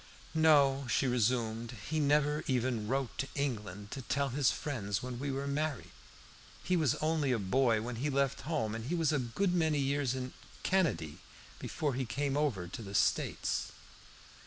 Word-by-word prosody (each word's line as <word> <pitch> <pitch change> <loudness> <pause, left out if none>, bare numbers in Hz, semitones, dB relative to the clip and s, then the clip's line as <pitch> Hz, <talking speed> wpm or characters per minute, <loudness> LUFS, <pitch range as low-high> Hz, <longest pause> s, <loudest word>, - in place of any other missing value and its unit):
"No," 140 -4 +4
she - - +2
resumed, 120 -1 0
"he 155 +1 0
never 150 +1 +2
even 125 -4 0
wrote 135 +1 -1
to 135 - 0
England 105 -8 -3
to 135 - -5
tell 140 +2 0
his 135 +1 +2
friends 105 -8 -2
when 125 -1 -5
we 140 +1 -2
were 135 +1 -2
married. 145 -1 -2 0.7
He 180 - +1
was 160 -5 +2
only 155 -3 +1
a 125 - +2
boy 110 +3 +2
when 120 0 -4
he 140 +5 -1
left 140 -1 +1
home, 140 -9 -1
and 115 0 -5
he 165 +7 -1
was 165 -2 +2
a 150 - +2
good 130 +10 0
many 160 -4 +2
years 140 -2 +1
in 130 0 -4 0.3
Canady 130 - +1 0.4
before 145 -3 -2
he 130 +1 -1
came 140 +4 -1
over 130 -12 0
to 90 - -7
the 100 -2 -7
States." - - +1
135 Hz, 175 wpm, -33 LUFS, 115-145 Hz, 0.7 s, No